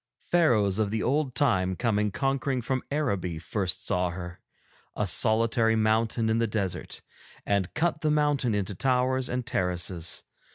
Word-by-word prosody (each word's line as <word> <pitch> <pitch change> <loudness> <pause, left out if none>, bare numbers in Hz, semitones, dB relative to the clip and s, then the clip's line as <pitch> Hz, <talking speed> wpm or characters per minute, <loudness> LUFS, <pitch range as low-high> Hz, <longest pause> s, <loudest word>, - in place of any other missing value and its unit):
Pharaohs 110 - +3
of 105 -2 +1
the 110 +1 -2
old 140 -1 0
time 95 -9 +2
coming 105 -1 0
conquering 135 +4 -1
from 130 +1 -1
Araby 100 - -1
first 90 +3 -3
saw 90 0 +1
her, 90 0 -7 0.6
a - - 0
solitary 115 0 +3
mountain 110 +1 +1
in 110 +1 +1
the 115 - +1
desert, 100 -4 -3 0.4
and 100 -2 0
cut 160 -1 0
the 155 - +1
mountain 145 -6 +1
into 100 0 -2
towers 130 +4 +1
and 125 -1 -2
terraces. 90 -5 -1
110 Hz, 150 wpm, -27 LUFS, 95-130 Hz, 0.6 s, Pharaohs